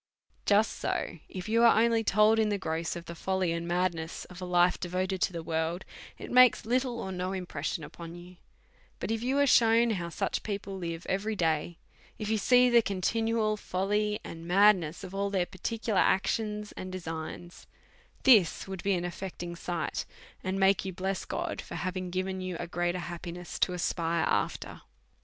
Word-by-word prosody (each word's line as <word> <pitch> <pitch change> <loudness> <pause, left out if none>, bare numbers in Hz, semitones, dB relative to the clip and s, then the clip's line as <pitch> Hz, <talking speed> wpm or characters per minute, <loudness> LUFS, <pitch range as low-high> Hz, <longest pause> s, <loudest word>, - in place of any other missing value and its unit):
Just 210 +2 +3
so, 170 - -2
if 185 0 -6
you 230 +2 +3
are 235 -2 +6
only 230 0 +3
told 215 +2 +4
in 215 -1 +3
the 205 - 0
gross 165 -2 -2
of 170 0 -7
the 170 - -7
folly 185 +1 -1
and 170 0 -3
madness 175 -2 -1
of 180 +1 -10
a - - -3
life 180 0 +3
devoted 185 +1 -2
to - - +2
the 170 -2 -5
world, 160 +2 -2 0.3
it - - -8
makes 250 -3 +6
little 245 0 0
or 190 - -4
no 185 +1 -3
impression 175 -4 -3
upon 165 +3 -9
you; 175 +1 -12 0.6
but - - -3
if 225 0 -1
you 260 +3 0
are 285 - +5
shewn 230 -2 +5
how 175 -5 -2
such - - -2
people 200 -2 -4
live 170 -2 -5
every 205 +3 -1
day; 165 -1 0 0.4
if 215 -2 -4
you 220 -1 +1
see 250 +4 +5
the 240 -1 +6
conti 200 +2 -1
nual 220 -2 +1
folly 210 +3 0
and 165 0 -8
madness 185 -3 +4
of 190 0 -8
all 200 +1 -1
their 190 -3 +1
particular 200 +3 -2
actions 210 +2 +1
and 185 0 -7
designs, 170 -1 -7 0.6
this 215 -12 +5
would 190 -2 -5
be 200 -1 +1
an 175 0 -2
affecting 175 -1 -6
sight, 170 -1 -3 0.4
and 190 0 -2
make 195 0 +4
you 190 - -4
bless 190 +1 -3
God - - -3
for - - -9
having 185 0 -3
given 185 +1 -2
you 185 -2 -4
a - - -3
greater 175 +1 -1
happi 175 0 -6
ness 175 0 -7
to 180 - +2
aspire 170 -1 0
after. - - -1
185 Hz, 190 wpm, -29 LUFS, 175-210 Hz, 0.6 s, are